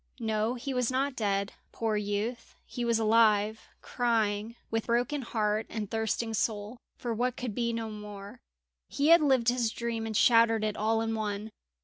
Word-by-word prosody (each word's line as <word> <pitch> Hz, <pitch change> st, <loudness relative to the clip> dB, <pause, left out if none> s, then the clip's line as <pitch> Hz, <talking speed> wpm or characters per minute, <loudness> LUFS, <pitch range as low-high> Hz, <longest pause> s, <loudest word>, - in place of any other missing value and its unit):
No, 220 Hz, +1 st, 0 dB
he 265 Hz, +2 st, -4 dB
was 250 Hz, -2 st, +1 dB
not 265 Hz, +1 st, 0 dB
dead, 200 Hz, -3 st, -1 dB, 0.2 s
poor 225 Hz, -2 st, -1 dB
youth, 210 Hz, +3 st, -3 dB
he 245 Hz, -, -5 dB
was 235 Hz, -1 st, +2 dB
alive, 220 Hz, -1 st, +3 dB, 0.2 s
crying, 225 Hz, -2 st, 0 dB, 0.2 s
with 225 Hz, 0 st, -1 dB
broken 245 Hz, +5 st, +1 dB
heart 215 Hz, -2 st, -1 dB
and 215 Hz, -3 st, -5 dB
thirsting 225 Hz, +1 st, -1 dB
soul, 215 Hz, +2 st, -2 dB, 0.2 s
for 240 Hz, -2 st, -3 dB
what 245 Hz, +2 st, -1 dB
could 245 Hz, -4 st, -4 dB
be 235 Hz, +2 st, -1 dB
no 225 Hz, -1 st, -4 dB
more. 210 Hz, +2 st, -9 dB, 0.5 s
He 285 Hz, +2 st, +1 dB
had 335 Hz, 0 st, +8 dB
lived 260 Hz, -5 st, +3 dB
his 240 Hz, -2 st, +1 dB
dream 230 Hz, -1 st, -3 dB
and 220 Hz, -2 st, -1 dB
shattered 230 Hz, -2 st, +5 dB
it 215 Hz, -1 st, -1 dB
all 225 Hz, +1 st, +1 dB
in 225 Hz, 0 st, -1 dB
one. 215 Hz, 0 st, -3 dB
225 Hz, 170 wpm, -29 LUFS, 215-240 Hz, 0.5 s, had